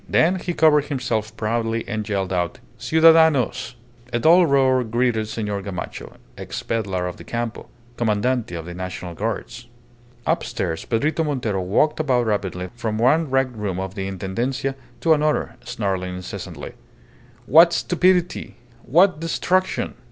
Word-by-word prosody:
Then 180 Hz, +4 st, +3 dB
he 175 Hz, -1 st, -4 dB
covered 150 Hz, -2 st, +4 dB
himself 115 Hz, -6 st, -3 dB
proudly 115 Hz, +1 st, -1 dB
and 110 Hz, -1 st, -4 dB
yelled 95 Hz, -2 st, -1 dB
out, 90 Hz, -2 st, -1 dB, 0.2 s
"Ciudadanos!" 160 Hz, -7 st, +4 dB, 0.4 s
A -, -, 0 dB
dull 170 Hz, +6 st, +5 dB
roar 130 Hz, -2 st, +3 dB
greeted 115 Hz, -1 st, 0 dB
Senor 105 Hz, -2 st, -3 dB
Gamacho, 95 Hz, -4 st, -7 dB, 0.2 s
ex -, -, -6 dB
pedlar 95 Hz, -6 st, -2 dB
of 90 Hz, -, -6 dB
the -, -, -11 dB
Campo, 120 Hz, -1 st, -4 dB, 0.3 s
Commandante 115 Hz, -2 st, 0 dB
of 80 Hz, -1 st, -6 dB
the 90 Hz, -, -7 dB
National 90 Hz, -1 st, -6 dB
Guards. 115 Hz, +5 st, -4 dB, 0.6 s
Upstairs 95 Hz, -9 st, -2 dB
Pedrito 150 Hz, +8 st, 0 dB
Montero 120 Hz, -10 st, -1 dB
walked 110 Hz, +14 st, +1 dB
about 130 Hz, -6 st, +2 dB
rapidly 95 Hz, -4 st, -2 dB
from 110 Hz, -2 st, -3 dB
one 145 Hz, +7 st, +3 dB
wrecked 135 Hz, -2 st, +1 dB
room 100 Hz, -4 st, -3 dB
of 95 Hz, 0 st, -4 dB
the 95 Hz, -1 st, -4 dB
Intendencia 120 Hz, +9 st, -2 dB, 0.3 s
to 165 Hz, -, +5 dB
another, 150 Hz, 0 st, 0 dB
snarling 95 Hz, -3 st, -3 dB
incessantly 90 Hz, 0 st, -7 dB, 0.7 s
"What 165 Hz, +6 st, +7 dB
stupidity! 180 Hz, +1 st, +1 dB, 0.3 s
What 175 Hz, -, +4 dB
destruction!" 185 Hz, +3 st, 0 dB
120 Hz, 135 wpm, -22 LUFS, 100-150 Hz, 0.7 s, What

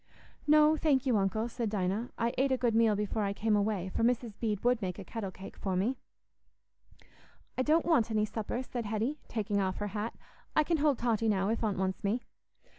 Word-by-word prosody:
"No, 305 Hz, +1 st, +6 dB
thank 290 Hz, -4 st, +2 dB
you, 255 Hz, -3 st, +3 dB
Uncle," 200 Hz, +3 st, 0 dB
said 235 Hz, -1 st, -3 dB
Dinah; 205 Hz, +3 st, -1 dB
"I 235 Hz, +1 st, 0 dB
ate 265 Hz, +1 st, +2 dB
a 260 Hz, -, +3 dB
good 240 Hz, -2 st, +1 dB
meal 225 Hz, -1 st, +4 dB
before 210 Hz, +1 st, -1 dB
I 200 Hz, -1 st, 0 dB
came 215 Hz, +1 st, +1 dB
away, 200 Hz, -3 st, 0 dB
for -, -, 0 dB
Mrs. 235 Hz, -2 st, +1 dB
Bede 210 Hz, -4 st, -1 dB
would 245 Hz, -1 st, +2 dB
make 180 Hz, -2 st, -3 dB
a 200 Hz, -, -7 dB
kettle 205 Hz, 0 st, -5 dB
cake 190 Hz, +1 st, -10 dB
for 190 Hz, -2 st, -2 dB
me." 225 Hz, +8 st, 0 dB, 1.6 s
"I -, -, 0 dB
don't 310 Hz, +5 st, +3 dB
want 295 Hz, -10 st, +3 dB
any 215 Hz, -1 st, +1 dB
supper," 220 Hz, +3 st, -3 dB
said 240 Hz, -2 st, -5 dB
Hetty, 225 Hz, +8 st, -1 dB
taking 205 Hz, -3 st, -1 dB
off 190 Hz, -1 st, -1 dB
her 205 Hz, 0 st, -3 dB
hat. 210 Hz, +3 st, -4 dB, 0.4 s
"I 305 Hz, -, +5 dB
can 330 Hz, +2 st, +1 dB
hold 290 Hz, -3 st, +2 dB
Totty 230 Hz, -2 st, +1 dB
now, 195 Hz, -1 st, +1 dB
if 230 Hz, +1 st, -1 dB
Aunt 210 Hz, -3 st, 0 dB
wants 190 Hz, +1 st, -2 dB
me." 220 Hz, +5 st, 0 dB
220 Hz, 210 wpm, -31 LUFS, 205-250 Hz, 1.6 s, No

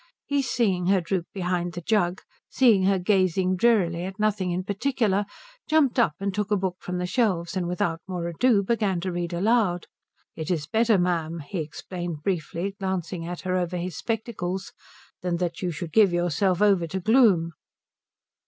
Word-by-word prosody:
He, 285 Hz, -1 st, +1 dB
seeing 205 Hz, -9 st, 0 dB
her 195 Hz, 0 st, +4 dB
droop 175 Hz, 0 st, -2 dB
behind 180 Hz, -2 st, -2 dB
the 175 Hz, -, -6 dB
jug, 185 Hz, -1 st, 0 dB, 0.3 s
seeing 220 Hz, -8 st, +4 dB
her 195 Hz, 0 st, +3 dB
gazing 185 Hz, -1 st, +2 dB
drearily 180 Hz, -5 st, +2 dB
at 190 Hz, 0 st, -7 dB
nothing 210 Hz, -3 st, 0 dB
in 180 Hz, +1 st, -1 dB
particular, 205 Hz, -1 st, 0 dB, 0.4 s
jumped 300 Hz, -5 st, +3 dB
up 170 Hz, -11 st, +3 dB
and 195 Hz, 0 st, -2 dB
took 210 Hz, +1 st, -2 dB
a 210 Hz, -, +2 dB
book 185 Hz, -1 st, -2 dB
from 180 Hz, 0 st, -4 dB
the 180 Hz, -, -2 dB
shelves 180 Hz, -4 st, 0 dB
and 180 Hz, -2 st, -1 dB
without 170 Hz, -2 st, -1 dB
more 180 Hz, -2 st, -3 dB
ado 200 Hz, +5 st, +2 dB
began 200 Hz, -4 st, 0 dB
to 185 Hz, +1 st, -2 dB
read 175 Hz, 0 st, -3 dB
aloud. 185 Hz, -1 st, +1 dB, 0.5 s
"It 160 Hz, -2 st, -5 dB
is 160 Hz, -5 st, -1 dB
better, 220 Hz, +6 st, +3 dB
ma'am," 170 Hz, -2 st, 0 dB
he 170 Hz, +6 st, -5 dB
explained 165 Hz, +1 st, -6 dB
briefly, 185 Hz, +1 st, -2 dB
glancing 185 Hz, -3 st, -3 dB
at 175 Hz, 0 st, -5 dB
her 185 Hz, -1 st, -1 dB
over 180 Hz, 0 st, -1 dB
his 175 Hz, -1 st, -4 dB
spectacles, 200 Hz, -4 st, -3 dB, 0.5 s
"than 175 Hz, -1 st, -1 dB
that 175 Hz, -1 st, -3 dB
you 180 Hz, -, -1 dB
should 165 Hz, 0 st, -6 dB
give 210 Hz, -4 st, +5 dB
yourself 175 Hz, +2 st, +1 dB
over 195 Hz, -5 st, +3 dB
to 190 Hz, +4 st, -3 dB
gloom." 200 Hz, -5 st, +4 dB
185 Hz, 175 wpm, -25 LUFS, 175-205 Hz, 0.5 s, give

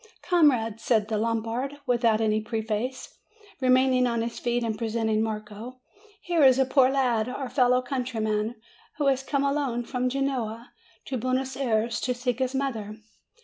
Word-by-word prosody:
"Comrades," 250 Hz, -11 st, +2 dB
said 220 Hz, -3 st, +2 dB
the 220 Hz, -, 0 dB
Lombard, 230 Hz, +5 st, -2 dB
without 235 Hz, -3 st, +2 dB
any 215 Hz, 0 st, +1 dB
pre 220 Hz, 0 st, -3 dB
face, 230 Hz, +4 st, -4 dB, 0.4 s
remaining 255 Hz, 0 st, +4 dB
on 235 Hz, -1 st, 0 dB
his 230 Hz, 0 st, -5 dB
feet, 240 Hz, 0 st, 0 dB
and 225 Hz, -2 st, -1 dB
presenting 220 Hz, -1 st, 0 dB
Marco, 220 Hz, +3 st, -5 dB, 0.4 s
"here 345 Hz, -2 st, +1 dB
is 260 Hz, -1 st, +7 dB
a 265 Hz, -, +3 dB
poor 260 Hz, -1 st, +4 dB
lad, 250 Hz, -4 st, +1 dB
our 260 Hz, 0 st, -4 dB
fellow 250 Hz, -1 st, +3 dB
countryman, 230 Hz, -4 st, -2 dB, 0.4 s
who 295 Hz, -, 0 dB
has 270 Hz, -1 st, +2 dB
come 280 Hz, 0 st, -1 dB
alone 275 Hz, -4 st, 0 dB
from 250 Hz, +1 st, -1 dB
Genoa 250 Hz, -4 st, -3 dB, 0.3 s
to 260 Hz, -, -3 dB
Buenos 255 Hz, +2 st, -1 dB
Ayres 235 Hz, -3 st, 0 dB
to 250 Hz, -1 st, -1 dB
seek 245 Hz, 0 st, -2 dB
his 260 Hz, 0 st, -1 dB
mother. 225 Hz, -6 st, -3 dB
245 Hz, 160 wpm, -26 LUFS, 225-260 Hz, 0.4 s, is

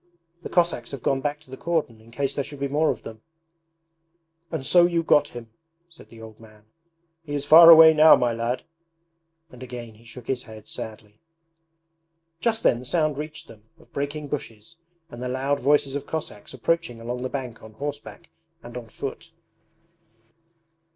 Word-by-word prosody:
The -, -, -7 dB
Cossacks 175 Hz, -1 st, 0 dB
have 135 Hz, -, -7 dB
gone 135 Hz, -1 st, 0 dB
back 145 Hz, +1 st, -2 dB
to 135 Hz, -, -18 dB
the 130 Hz, -, -8 dB
cordon 155 Hz, -10 st, -2 dB
in 115 Hz, -, -19 dB
case 135 Hz, +3 st, -2 dB
there 140 Hz, -, -2 dB
should 145 Hz, 0 st, -10 dB
be 140 Hz, -, -1 dB
any 140 Hz, -, -5 dB
more 155 Hz, +1 st, +2 dB
of -, -, -3 dB
them.' 110 Hz, -1 st, -10 dB, 1.3 s
'And 155 Hz, -5 st, -4 dB
so 175 Hz, +2 st, +5 dB
you 170 Hz, -1 st, 0 dB
got 150 Hz, -, +4 dB
him!' 120 Hz, -2 st, -11 dB, 0.4 s
said 165 Hz, -, -17 dB
the 115 Hz, -, -15 dB
old 110 Hz, -1 st, -12 dB
man. 110 Hz, -1 st, -18 dB, 0.6 s
'He 145 Hz, -2 st, -5 dB
is 145 Hz, 0 st, -3 dB
far 165 Hz, +3 st, +9 dB
away 160 Hz, -1 st, +10 dB
now, 155 Hz, +1 st, +8 dB
my 120 Hz, -1 st, 0 dB
lad! 120 Hz, +2 st, -3 dB, 0.4 s
...' 165 Hz, 0 st, -44 dB
And 125 Hz, -, -14 dB
again 120 Hz, -3 st, -8 dB
he 110 Hz, +2 st, -20 dB
shook 115 Hz, +1 st, -12 dB
his 130 Hz, -2 st, -2 dB
head 110 Hz, -3 st, -13 dB
sadly. 110 Hz, -1 st, -9 dB, 1.2 s
Just 225 Hz, +1 st, -1 dB
then 120 Hz, -, +3 dB
the 125 Hz, -, -10 dB
sound 155 Hz, 0 st, 0 dB
reached 150 Hz, 0 st, -7 dB
them 110 Hz, -1 st, -16 dB
of -, -, -23 dB
breaking 145 Hz, +1 st, -4 dB
bushes 135 Hz, 0 st, -7 dB, 0.3 s
and 120 Hz, -, -9 dB
the 125 Hz, -, -3 dB
loud 135 Hz, +2 st, -1 dB
voices 140 Hz, -1 st, +2 dB
of 145 Hz, 0 st, -5 dB
Cossacks 150 Hz, -10 st, -6 dB
approaching 130 Hz, -2 st, -2 dB
along 120 Hz, +2 st, -5 dB
the 130 Hz, -, -3 dB
bank 130 Hz, -4 st, -6 dB
on 110 Hz, 0 st, -13 dB
horseback 145 Hz, +6 st, -8 dB, 0.3 s
and 120 Hz, 0 st, -11 dB
on 120 Hz, -2 st, -8 dB
foot. 140 Hz, +7 st, -7 dB
135 Hz, 185 wpm, -24 LUFS, 115-155 Hz, 1.3 s, away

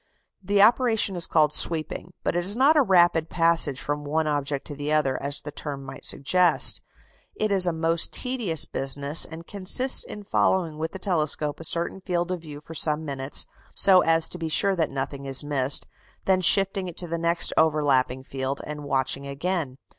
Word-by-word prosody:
The 200 Hz, +1 st, +2 dB
operation 225 Hz, -3 st, +2 dB
is 175 Hz, -, -2 dB
called 150 Hz, -1 st, +2 dB
sweeping; 165 Hz, +1 st, -2 dB
but -, -, -2 dB
it 175 Hz, -, -1 dB
is 200 Hz, +4 st, 0 dB
not 275 Hz, +6 st, +3 dB
a 300 Hz, -, +5 dB
rapid 175 Hz, -, +2 dB
passage 165 Hz, -5 st, +1 dB
from 145 Hz, 0 st, -4 dB
one 155 Hz, +2 st, -2 dB
object 145 Hz, -2 st, -3 dB
to -, -, -8 dB
another, 145 Hz, -1 st, -1 dB
as 145 Hz, +1 st, -4 dB
the 150 Hz, -, -8 dB
term 140 Hz, -2 st, -6 dB
might 135 Hz, 0 st, -10 dB
suggest; 180 Hz, +6 st, +2 dB, 0.5 s
it 215 Hz, -1 st, -2 dB
is 190 Hz, -2 st, +4 dB
a -, -, +2 dB
most 165 Hz, 0 st, 0 dB
tedious 235 Hz, -, -1 dB
business, 140 Hz, +3 st, +1 dB
and 165 Hz, +1 st, -11 dB
consists 205 Hz, +8 st, +3 dB
in 210 Hz, -, -10 dB
following 170 Hz, -5 st, -1 dB
with 160 Hz, +1 st, -4 dB
the -, -, -6 dB
telescope 155 Hz, -5 st, 0 dB
a -, -, -9 dB
certain 170 Hz, +4 st, -1 dB
field 175 Hz, -1 st, -3 dB
of 180 Hz, -2 st, -4 dB
view 150 Hz, -3 st, -11 dB
for 160 Hz, -, -12 dB
some 155 Hz, 0 st, -1 dB
minutes, 135 Hz, -1 st, -1 dB, 0.3 s
so 190 Hz, -2 st, +6 dB
as 165 Hz, 0 st, +4 dB
to 180 Hz, -, -7 dB
be 165 Hz, -1 st, -4 dB
sure 195 Hz, +4 st, +3 dB
that 165 Hz, -3 st, -1 dB
nothing 135 Hz, 0 st, -6 dB
is 135 Hz, +1 st, +3 dB
missed, 140 Hz, -2 st, 0 dB, 0.4 s
then 190 Hz, -1 st, +2 dB
shifting 195 Hz, +1 st, +3 dB
it 175 Hz, -, -9 dB
to 180 Hz, -, -2 dB
the 170 Hz, 0 st, -4 dB
next 170 Hz, +1 st, 0 dB
overlapping 140 Hz, -5 st, +1 dB
field, 135 Hz, +1 st, -4 dB
and 150 Hz, 0 st, -8 dB
watching 135 Hz, 0 st, -2 dB
again. 145 Hz, -1 st, -4 dB
160 Hz, 190 wpm, -24 LUFS, 145-185 Hz, 0.5 s, so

